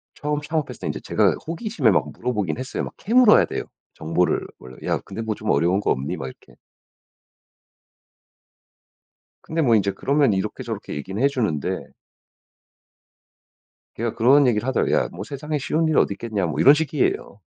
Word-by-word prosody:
처음 150 Hz, 0 st, -2 dB
창업했을 155 Hz, -1 st, -3 dB
때 -, -, -3 dB
이제 -, -, -3 dB
제가 -, -, +2 dB
호기심에 165 Hz, -, +1 dB
막 -, -, +1 dB
물어보긴 105 Hz, -8 st, -2 dB
했어요. 130 Hz, -, -4 dB
막 -, -, -7 dB
캐물어야 235 Hz, +1 st, +5 dB
돼요 -, -, -4 dB, 0.3 s
정보를 85 Hz, +2 st, 0 dB
원래. 65 Hz, +1 st, -12 dB
"야 -, -, +1 dB
근데 105 Hz, +4 st, -7 dB
뭐 110 Hz, -2 st, -2 dB
좀 105 Hz, -, -5 dB
어려운 90 Hz, +4 st, +3 dB
거 -, -, 0 dB
없니?" 65 Hz, +2 st, -2 dB
막 65 Hz, -, -5 dB
이렇게. -, -, -14 dB, 2.9 s
근데 160 Hz, 0 st, -2 dB
뭐 120 Hz, -6 st, +4 dB
이제 100 Hz, -1 st, +2 dB
그러면 140 Hz, -3 st, +2 dB
이렇게 95 Hz, -, -3 dB
저렇게 -, -, -6 dB
얘기는 95 Hz, -, -5 dB
해 140 Hz, -, +5 dB
주는데 110 Hz, -, -2 dB, 2.1 s
걔가 115 Hz, 0 st, -2 dB
그런 130 Hz, +4 st, +5 dB
얘기를 120 Hz, +1 st, +1 dB
하더라고요. 130 Hz, -, +1 dB
"야 -, -, +1 dB
뭐 90 Hz, +4 st, -7 dB
세상에 150 Hz, +4 st, -4 dB
쉬운 155 Hz, +3 st, 0 dB
일이 155 Hz, -, +1 dB
어디 100 Hz, -, +3 dB
있겠냐." 105 Hz, -4 st, -2 dB
뭐 80 Hz, -, -3 dB
이런 140 Hz, -, +8 dB
식이에요. 375 Hz, -, -1 dB
125 Hz, 355 characters per minute, -23 LUFS, 100-150 Hz, 2.9 s, 이런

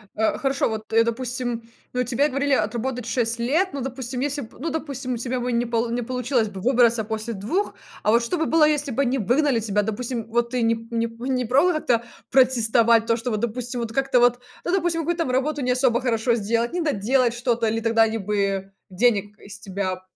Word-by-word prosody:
э, 220 Hz, 0 st, +1 dB
хорошо, 270 Hz, -3 st, 0 dB
вот, 220 Hz, 0 st, -6 dB
э, 230 Hz, 0 st, +6 dB
допустим, 235 Hz, -1 st, -3 dB, 0.2 s
ну, 250 Hz, 0 st, 0 dB
тебе 275 Hz, +5 st, +1 dB
говорили 275 Hz, +1 st, 0 dB
отработать 240 Hz, +2 st, -1 dB
6 235 Hz, -1 st, -1 dB
лет. 305 Hz, +11 st, +1 dB
Ну, 275 Hz, -, -4 dB
допустим, 255 Hz, -1 st, -4 dB
если 285 Hz, 0 st, -1 dB
б 225 Hz, -, -14 dB
ну, 330 Hz, +4 st, -2 dB
допустим, 270 Hz, -5 st, -4 dB
у -, -, -4 dB
тебя 245 Hz, +1 st, -3 dB
бы 250 Hz, 0 st, -1 dB
не 235 Hz, +1 st, +1 dB
пол 230 Hz, 0 st, -1 dB
не 240 Hz, 0 st, -2 dB
получилось 250 Hz, -2 st, 0 dB
бы 195 Hz, -2 st, -8 dB
выбраться 235 Hz, -2 st, +3 dB
после 220 Hz, +2 st, -4 dB
2, 235 Hz, -, -2 dB, 0.3 s
а 210 Hz, -, +2 dB
вот 235 Hz, +1 st, +4 dB
что 340 Hz, +10 st, -1 dB
бы 320 Hz, -, 0 dB
было, 315 Hz, 0 st, +4 dB
если 295 Hz, -2 st, 0 dB
бы 275 Hz, -, 0 dB
они 265 Hz, 0 st, +1 dB
выгнали 250 Hz, +3 st, +2 dB
тебя, 210 Hz, -1 st, 0 dB
допустим, 230 Hz, +2 st, -3 dB
вот 235 Hz, +1 st, 0 dB
ты 250 Hz, -1 st, 0 dB
не 230 Hz, 0 st, +3 dB
п 230 Hz, +1 st, -9 dB
не 230 Hz, 0 st, +1 dB
п 230 Hz, +3 st, -8 dB
не 255 Hz, -1 st, 0 dB
пробовала 280 Hz, +10 st, +3 dB
как-то 235 Hz, -4 st, +1 dB, 0.3 s
протестовать 235 Hz, -3 st, +4 dB
то, 230 Hz, -, +2 dB
что 235 Hz, +2 st, -3 dB
вот, 215 Hz, -1 st, -2 dB
допустим, 240 Hz, +1 st, -3 dB
вот 225 Hz, -1 st, -4 dB
как-то 270 Hz, 0 st, +2 dB
вот, 245 Hz, 0 st, +4 dB, 0.2 s
ну, 350 Hz, -, -1 dB
допустим, 345 Hz, -3 st, +1 dB
какую-то 335 Hz, +1 st, -1 dB
работу 280 Hz, +3 st, 0 dB
не 250 Hz, 0 st, +1 dB
особо 250 Hz, -2 st, +2 dB
хорошо 235 Hz, -1 st, +1 dB
сделать, 230 Hz, +2 st, 0 dB
не 355 Hz, -, -2 dB
доделать 255 Hz, -4 st, +1 dB
что-то, 235 Hz, -1 st, 0 dB
или 225 Hz, +1 st, 0 dB
тогда 225 Hz, 0 st, +4 dB
они 225 Hz, 0 st, 0 dB
бы 195 Hz, -1 st, -1 dB, 0.2 s
денег 205 Hz, 0 st, +1 dB
из 200 Hz, 0 st, -11 dB
тебя 185 Hz, -2 st, -3 dB
240 Hz, 220 wpm, -23 LUFS, 225-265 Hz, 0.3 s, э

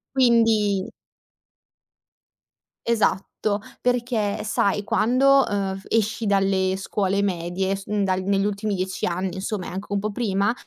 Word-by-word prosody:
Quindi 225 Hz, -6 st, +3 dB, 2.0 s
Esatto. 220 Hz, -4 st, +2 dB, 0.6 s
Perché, 240 Hz, -4 st, 0 dB
sai, 205 Hz, -1 st, 0 dB
quando, 260 Hz, +6 st, +4 dB
uhm, 195 Hz, -2 st, -2 dB
f 195 Hz, -, -14 dB
esci 225 Hz, 0 st, 0 dB
dalle 195 Hz, -1 st, +2 dB
scuole 195 Hz, 0 st, -1 dB
medie 185 Hz, +1 st, -1 dB
s 195 Hz, 0 st, -9 dB
mhmm, 210 Hz, -1 st, 0 dB
dal 185 Hz, -1 st, 0 dB
negli 195 Hz, +1 st, +1 dB
ultimi 205 Hz, +1 st, -2 dB
10 185 Hz, 0 st, -2 dB
anni, 180 Hz, +1 st, -2 dB
insomma, 190 Hz, 0 st, -3 dB
e -, -, -6 dB
anche 190 Hz, +3 st, -6 dB
un 200 Hz, -, +1 dB
po' 215 Hz, +2 st, -3 dB
prima, 205 Hz, -1 st, 0 dB
200 Hz, 135 wpm, -23 LUFS, 190-220 Hz, 2.0 s, quando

